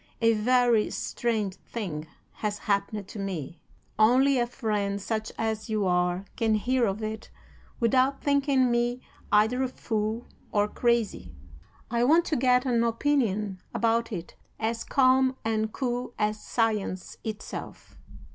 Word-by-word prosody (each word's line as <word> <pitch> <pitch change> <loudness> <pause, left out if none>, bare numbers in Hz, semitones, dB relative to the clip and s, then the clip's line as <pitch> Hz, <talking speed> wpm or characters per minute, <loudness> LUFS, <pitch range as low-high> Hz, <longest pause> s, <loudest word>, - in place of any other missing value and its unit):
A 230 -1 +4
very 240 0 +3
strange 220 -5 -2
thing 160 -9 -5 0.3
has 210 -1 -2
happened 200 -1 -1
to 210 - -7
me. 175 -5 -5 0.4
Only 255 +5 +5
a 240 - +1
friend 210 -5 -1
such 220 +2 -3
as 220 0 -2
you 215 -2 0
are 180 +1 +1
can 225 -1 +2
hear 245 +2 +1
of 200 +3 -3
it 215 0 -5 0.5
without 255 +4 +3
thinking 280 -3 +2
me 240 +1 +1 0.3
either 220 +5 +4
a 260 - +1
fool 220 -1 -3 0.3
or 205 0 +2
crazy. 225 - 0 0.6
I 235 0 +2
want 325 +7 +5
to 310 - 0
get 250 0 +3
an 235 -3 +2
opinion 225 -6 0
about 230 0 +1
it 175 -5 -6 0.2
as 230 +1 -1
calm 260 0 +3
and 220 -1 0
cool 245 -1 -3
as 210 0 0
science 215 -5 -1
itself. 215 -1 -7
225 Hz, 135 wpm, -27 LUFS, 210-245 Hz, 0.6 s, Only